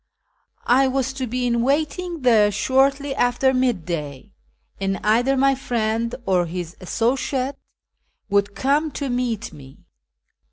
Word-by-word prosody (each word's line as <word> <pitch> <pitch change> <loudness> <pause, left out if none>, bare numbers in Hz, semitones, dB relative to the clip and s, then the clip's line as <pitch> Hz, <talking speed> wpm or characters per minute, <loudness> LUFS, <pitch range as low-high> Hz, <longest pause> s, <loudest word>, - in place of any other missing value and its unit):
I 265 +2 +4
was 265 0 -1
to 265 -1 -4
be 250 +2 -2
in 240 - +1
M - - +1
aiting 315 +2 -1
there 220 -4 +5
shortly 270 +6 +1
after 260 +1 +2
midday, 170 - -2 0.5
and 195 0 -1
either 240 +6 +2
my 275 +1 +4
friend 230 -3 -2
or 180 -2 +2
his 175 0 -6
associate 255 +6 -1 0.7
would 200 0 +1
come 285 +8 +1
to 280 -2 -3
meet 245 -3 -2
me. 135 -2 -13
245 Hz, 130 wpm, -22 LUFS, 200-270 Hz, 0.7 s, there